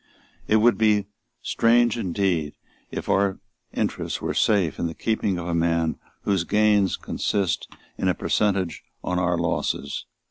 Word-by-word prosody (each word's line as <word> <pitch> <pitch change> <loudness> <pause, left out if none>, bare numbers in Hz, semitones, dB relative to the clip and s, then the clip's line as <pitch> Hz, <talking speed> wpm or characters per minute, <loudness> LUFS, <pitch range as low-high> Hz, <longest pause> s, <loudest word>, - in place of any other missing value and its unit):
It 110 - +3
would 115 +2 +4
be 105 -2 +3 0.4
strange 120 0 +3
indeed 90 -7 -1 0.3
if - - -5
our 100 -1 +2 0.3
interests - - -2
were - - -2
safe 100 -7 +2
in 85 - 0
the 80 - -6
keeping 105 -4 0
of 85 - -5
a 85 - -2
man 85 -1 +1 0.2
whose 95 -4 +1
gains 105 0 +3
consist 100 -4 -1 0.3
in - - 0
a - - +2
percentage 95 -6 0 0.2
on 90 0 -1
our 90 -1 +1
losses. 80 -4 -2
95 Hz, 145 wpm, -24 LUFS, 85-105 Hz, 0.4 s, would